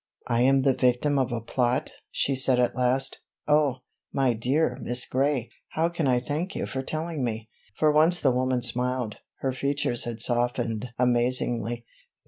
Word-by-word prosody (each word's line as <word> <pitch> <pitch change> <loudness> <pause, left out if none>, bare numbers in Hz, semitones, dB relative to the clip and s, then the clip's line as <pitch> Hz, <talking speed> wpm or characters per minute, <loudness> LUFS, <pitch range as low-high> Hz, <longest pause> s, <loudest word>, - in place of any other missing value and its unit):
"I 120 0 +1
am 135 +1 +4
the 135 -1 +4
victim 130 +3 +2
of 130 -1 0
a 120 -1 -2
plot," 125 +2 0 0.2
she 140 - 0
said 130 -1 +3
at 125 -1 +1
last. 130 +2 +1 0.3
"Oh, 150 -4 +2 0.3
my 135 -3 +2
dear 130 +8 0
Miss 120 0 0
Gray, 135 -2 0 0.2
how 165 +2 +1
can 170 -4 -1
I 125 -1 +3
thank 155 +9 -3
you - - -2
for 130 - -4
telling 155 +1 -3
me?" 110 -2 -3 0.3
For 155 -1 +4
once 160 +4 +4
the 135 - +3
woman 125 0 0
smiled; 125 -1 0 0.2
her 135 - 0
features 140 -2 -1
had 120 -1 -5
softened 120 -1 0
amazingly. 120 -1 +1
125 Hz, 165 wpm, -26 LUFS, 120-140 Hz, 0.3 s, am